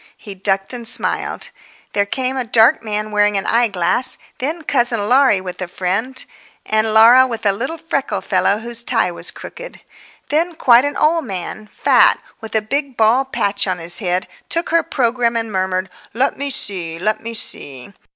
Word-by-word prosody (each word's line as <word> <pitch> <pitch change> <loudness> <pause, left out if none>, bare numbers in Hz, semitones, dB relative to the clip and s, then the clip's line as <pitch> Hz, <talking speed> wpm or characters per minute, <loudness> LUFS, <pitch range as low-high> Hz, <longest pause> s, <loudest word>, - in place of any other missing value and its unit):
He 205 - -9
ducked 195 +2 -1
and 240 -2 -5
smiled. - - 0 0.4
There 200 0 +1
came 260 +4 -2
a 260 - -1
dark 230 +4 +4
man 215 0 -3
wearing 210 -1 +2
an 195 - -3
eyeglass, 225 0 +1 0.2
then 315 +5 -3
cousin 240 -7 0
Laurie 255 -6 +4
with 180 0 -8
a 185 - -3
friend, 195 +9 -3 0.4
and 215 0 +1
Laura 235 +4 +7
with 230 -3 -6
a 200 - +5
little 265 +11 -4
freckled 325 -4 -3
fellow 195 +1 +2
whose 235 +1 +1
tie 225 -6 +1
was 170 - -3
crooked. - - -10 0.5
Then 330 +3 0
quite 245 -3 +5
an 285 0 -3
old 320 0 +2
man—fat, 205 +1 +1 0.2
with 220 -1 -8
a 220 - +1
big 275 +3 -3
bald 245 +5 +2
patch 200 0 0
on 185 -1 -1
his 170 +1 -2
head—took 185 - -3
her 335 0 +3
programme 235 -4 0
and 225 -1 -3
murmured, 185 -1 -1 0.3
"Let 260 +4 +1
me 280 +1 -3
see, 180 -10 -1
let 215 +5 -1
me 230 +1 -6
see!" 140 - -4
225 Hz, 170 wpm, -18 LUFS, 195-260 Hz, 0.5 s, Laura